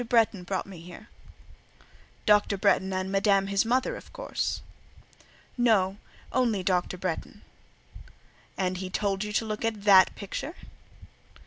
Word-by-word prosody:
Bretton 225 Hz, -5 st, +3 dB
brought 185 Hz, +1 st, -3 dB
me 190 Hz, -4 st, -11 dB
here." 180 Hz, +6 st, -12 dB, 1.2 s
"Dr. 210 Hz, -1 st, +4 dB
Bretton 190 Hz, -1 st, +2 dB
and 185 Hz, 0 st, -2 dB
Madame 195 Hz, 0 st, +3 dB
his 195 Hz, +2 st, +1 dB
mother, 255 Hz, +3 st, +1 dB
of -, -, -12 dB
course?" -, -, -3 dB, 1.0 s
"No; 200 Hz, -5 st, +3 dB, 0.4 s
only 230 Hz, -7 st, +1 dB
Dr. 180 Hz, 0 st, 0 dB
Bretton." 180 Hz, -2 st, -5 dB, 1.1 s
"And 185 Hz, -1 st, -1 dB
he 185 Hz, 0 st, -5 dB
told 195 Hz, +1 st, -1 dB
you 210 Hz, -, -4 dB
to 225 Hz, -, +1 dB
look 215 Hz, 0 st, -4 dB
at 220 Hz, -3 st, -2 dB
that 195 Hz, -3 st, +6 dB
picture?" 275 Hz, -, -6 dB
200 Hz, 130 wpm, -27 LUFS, 185-215 Hz, 1.2 s, that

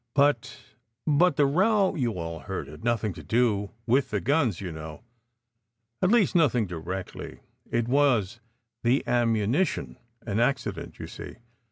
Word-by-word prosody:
But 140 Hz, -4 st, +2 dB, 0.5 s
but 165 Hz, +4 st, +4 dB
the 145 Hz, -, +4 dB
row 195 Hz, +7 st, +3 dB
you 125 Hz, -, -1 dB
all 85 Hz, -1 st, -5 dB
heard -, -, -5 dB
had 75 Hz, +6 st, -12 dB
nothing 115 Hz, -4 st, 0 dB
to -, -, -10 dB
do 110 Hz, -4 st, +1 dB, 0.2 s
with 130 Hz, +4 st, +2 dB
the 105 Hz, -, 0 dB
guns, 135 Hz, -, +1 dB
you 95 Hz, -3 st, -5 dB
know. 80 Hz, +4 st, -8 dB, 1.0 s
At 185 Hz, -, +3 dB
least, 230 Hz, -2 st, +4 dB
nothing 135 Hz, -, +3 dB
directly. 90 Hz, +1 st, -6 dB, 0.3 s
It 120 Hz, -1 st, 0 dB
was 120 Hz, -6 st, +2 dB, 0.4 s
the 120 Hz, +4 st, +2 dB
ammunition; 115 Hz, -, +1 dB, 0.3 s
an 105 Hz, -2 st, -2 dB
acci 120 Hz, -3 st, +1 dB
dent, 85 Hz, -, -9 dB
you -, -, -6 dB
see. -, -, -9 dB
120 Hz, 150 wpm, -27 LUFS, 100-145 Hz, 1.0 s, but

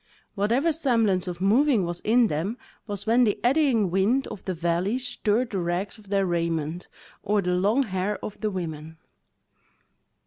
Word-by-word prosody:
Whatever 235 Hz, +11 st, +1 dB
semblance 230 Hz, -, +1 dB
of 175 Hz, 0 st, -5 dB
moving 225 Hz, +1 st, +3 dB
was 175 Hz, 0 st, -3 dB
in 235 Hz, +2 st, +3 dB
them 195 Hz, +6 st, -2 dB, 0.3 s
was 205 Hz, -1 st, -5 dB
when 235 Hz, +3 st, +4 dB
the 210 Hz, -4 st, +1 dB
eddying 245 Hz, -, +2 dB
wind 210 Hz, +9 st, +2 dB
of 210 Hz, -, -9 dB
the 185 Hz, -, -2 dB
valley 175 Hz, +6 st, 0 dB
stirred 245 Hz, -2 st, -1 dB
the 195 Hz, -, -1 dB
rags 175 Hz, +5 st, -3 dB
of 205 Hz, -2 st, -17 dB
their 195 Hz, -1 st, +1 dB
raiment, 170 Hz, -1 st, -2 dB, 0.3 s
or 210 Hz, 0 st, +1 dB
the 180 Hz, -2 st, 0 dB
long 205 Hz, +9 st, +2 dB
hair 195 Hz, -1 st, -2 dB
of 210 Hz, -, -8 dB
the 215 Hz, -, 0 dB
women. 160 Hz, -4 st, -6 dB
200 Hz, 165 wpm, -25 LUFS, 180-230 Hz, 0.3 s, when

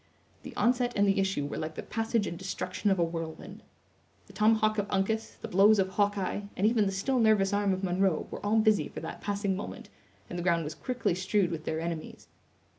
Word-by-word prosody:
The -, -, -10 dB
onset 245 Hz, 0 st, +2 dB
and 200 Hz, 0 st, +3 dB
the 195 Hz, 0 st, +2 dB
issue 195 Hz, -7 st, 0 dB
were 145 Hz, -, -4 dB
like 155 Hz, 0 st, -4 dB
the -, -, -5 dB
passage 225 Hz, -1 st, -1 dB
and 170 Hz, -, -4 dB
destruction 190 Hz, +2 st, -2 dB
of 195 Hz, -, +2 dB
a 175 Hz, -, +3 dB
whirlwind. 165 Hz, -1 st, -5 dB, 0.6 s
The 200 Hz, -, -16 dB
tomahawk 215 Hz, +1 st, +3 dB
of 205 Hz, 0 st, -2 dB
Uncas, 220 Hz, +3 st, -1 dB
the -, -, -6 dB
blows 205 Hz, +4 st, +5 dB
of 190 Hz, -1 st, +2 dB
Hawkeye, 205 Hz, 0 st, 0 dB, 0.2 s
and 195 Hz, -, +1 dB
even 220 Hz, -2 st, +3 dB
the -, -, 0 dB
still 250 Hz, +7 st, 0 dB
nervous 210 Hz, -3 st, +3 dB
arm 205 Hz, -1 st, +2 dB
of 190 Hz, +1 st, -2 dB
Munro 185 Hz, -2 st, +1 dB
were -, -, -7 dB
all 210 Hz, +2 st, +2 dB
busy 215 Hz, -1 st, +3 dB
for -, -, -8 dB
that -, -, -7 dB
passing 200 Hz, -1 st, -1 dB
moment, 200 Hz, -, -7 dB, 0.4 s
and 175 Hz, -, -5 dB
the -, -, -3 dB
ground 170 Hz, -2 st, +2 dB
was 150 Hz, +1 st, -5 dB
quickly 250 Hz, -3 st, -1 dB
strewed 190 Hz, +1 st, +1 dB
with 160 Hz, -1 st, -5 dB
their 160 Hz, -, -2 dB
enemies. 165 Hz, -1 st, -5 dB
195 Hz, 215 wpm, -29 LUFS, 180-215 Hz, 0.6 s, blows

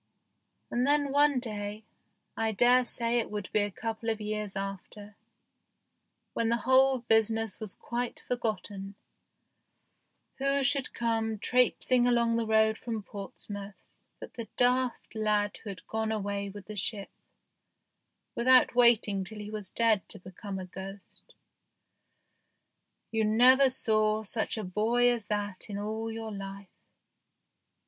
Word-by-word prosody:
And 245 Hz, +2 st, +1 dB
then 285 Hz, -1 st, +2 dB
one 285 Hz, -1 st, +4 dB
day, 210 Hz, -2 st, -5 dB, 0.5 s
I 225 Hz, -1 st, 0 dB
dare 245 Hz, +3 st, +4 dB
say 235 Hz, 0 st, 0 dB
it 230 Hz, -, -3 dB
would 205 Hz, -2 st, -5 dB
be 215 Hz, -, +2 dB
a 205 Hz, -, 0 dB
couple 225 Hz, +2 st, -4 dB
of 220 Hz, -1 st, -1 dB
years 210 Hz, -1 st, -4 dB
after, 195 Hz, +1 st, -7 dB, 1.2 s
when 230 Hz, -1 st, 0 dB
the 235 Hz, -, +2 dB
whole 260 Hz, -1 st, +4 dB
busi 225 Hz, -1 st, +3 dB
ness 225 Hz, -2 st, -3 dB
was 215 Hz, -3 st, -7 dB
quite 240 Hz, 0 st, -4 dB
forgotten, 210 Hz, -4 st, -3 dB, 1.4 s
who 275 Hz, +1 st, +2 dB
should 270 Hz, +1 st, 0 dB
come 225 Hz, -2 st, -1 dB
trapesing 250 Hz, +2 st, +2 dB
along 235 Hz, -1 st, +2 dB
the 230 Hz, -1 st, -1 dB
road 220 Hz, 0 st, +3 dB
from 225 Hz, -3 st, -4 dB
Portsmouth 200 Hz, 0 st, -9 dB, 0.2 s
but -, -, -10 dB
the 230 Hz, -2 st, -7 dB
daft 250 Hz, 0 st, +1 dB
lad 210 Hz, -2 st, 0 dB
who 215 Hz, -, -9 dB
had 185 Hz, -4 st, -9 dB
gone 220 Hz, 0 st, -2 dB
away 200 Hz, -1 st, -2 dB
with 205 Hz, 0 st, -10 dB
the 215 Hz, -, -8 dB
ship, 205 Hz, 0 st, -2 dB, 1.2 s
without 255 Hz, +1 st, +5 dB
waiting 235 Hz, -5 st, +4 dB
till 215 Hz, +4 st, -9 dB
he 210 Hz, 0 st, -7 dB
was 210 Hz, -3 st, -2 dB
dead 225 Hz, -4 st, +1 dB
to -, -, -4 dB
be 185 Hz, +1 st, -12 dB
come 195 Hz, +1 st, -6 dB
a 185 Hz, -, -5 dB
ghost. 190 Hz, +2 st, -11 dB, 1.8 s
You 225 Hz, -1 st, +1 dB
never 250 Hz, +5 st, +6 dB
saw 215 Hz, -3 st, +1 dB
such 220 Hz, +2 st, -2 dB
a 215 Hz, -, -3 dB
boy 225 Hz, +6 st, +2 dB
as 235 Hz, -3 st, -2 dB
that 205 Hz, -1 st, -3 dB
in 200 Hz, -, -4 dB
all 220 Hz, +2 st, -3 dB
your 225 Hz, 0 st, -6 dB
life. 195 Hz, 0 st, -10 dB
220 Hz, 140 wpm, -29 LUFS, 205-240 Hz, 1.8 s, never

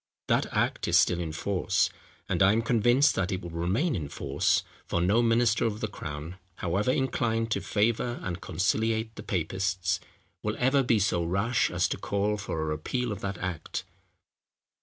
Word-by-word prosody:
That -, -, +3 dB
act -, -, 0 dB
is -, -, +5 dB
still 90 Hz, -, +3 dB
in 85 Hz, -2 st, -3 dB
force; 95 Hz, +4 st, 0 dB, 0.4 s
and -, -, -1 dB
I 95 Hz, +2 st, +6 dB
am 115 Hz, +1 st, +1 dB
convinced 120 Hz, +5 st, +4 dB
that 95 Hz, -2 st, -1 dB
it 95 Hz, -2 st, -3 dB
will 85 Hz, -, -6 dB
remain 95 Hz, -, 0 dB
in 75 Hz, -5 st, -4 dB
force; 70 Hz, 0 st, +1 dB, 0.2 s
for 85 Hz, -, 0 dB
no 100 Hz, +7 st, +3 dB
minister 115 Hz, -1 st, +3 dB
of 110 Hz, -2 st, -1 dB
the 110 Hz, -, -1 dB
crown, 80 Hz, -3 st, -7 dB, 0.2 s
however 95 Hz, +7 st, -1 dB
inclined 115 Hz, -4 st, 0 dB
to -, -, +1 dB
favour 115 Hz, +3 st, 0 dB
and 90 Hz, -1 st, -4 dB
conciliate 110 Hz, +5 st, 0 dB
the -, -, -8 dB
Papists, 95 Hz, 0 st, -1 dB, 0.4 s
will -, -, -2 dB
ever 135 Hz, +3 st, +3 dB
be 120 Hz, -3 st, +3 dB
so 95 Hz, -4 st, +1 dB
rash 100 Hz, +8 st, +1 dB
as -, -, +1 dB
to -, -, -2 dB
call 100 Hz, +1 st, 0 dB
for 100 Hz, -5 st, -4 dB
a -, -, -1 dB
repeal 95 Hz, +11 st, -2 dB
of 105 Hz, 0 st, -5 dB
that 100 Hz, -2 st, -3 dB
act. 90 Hz, -3 st, -4 dB
100 Hz, 180 wpm, -28 LUFS, 90-115 Hz, 0.4 s, I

